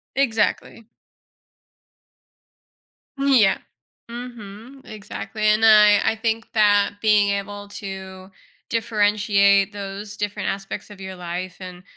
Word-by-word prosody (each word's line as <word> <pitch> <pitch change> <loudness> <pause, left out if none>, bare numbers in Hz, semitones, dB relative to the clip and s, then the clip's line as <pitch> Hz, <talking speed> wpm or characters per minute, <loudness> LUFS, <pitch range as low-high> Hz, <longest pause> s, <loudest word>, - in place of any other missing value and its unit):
Exactly. 230 -3 -1 2.3
Mm. 275 -2 +4
Yeah, 195 - +3 0.5
mhm, 240 +1 -10
exactly. 215 +1 -7
And 215 +1 +3
I 210 -1 +7
I - - +1
think 225 0 -3
that 205 -2 +3
being 210 -2 +3
able 205 0 -4
to 190 -2 -9 0.4
differentiate 205 -3 +2
those 200 0 -7
different 205 0 -3
aspects 195 +1 -6
of 205 -2 -13
your 190 -1 -7
life 180 0 -6
and 180 -1 -10
205 Hz, 105 wpm, -22 LUFS, 195-220 Hz, 2.3 s, I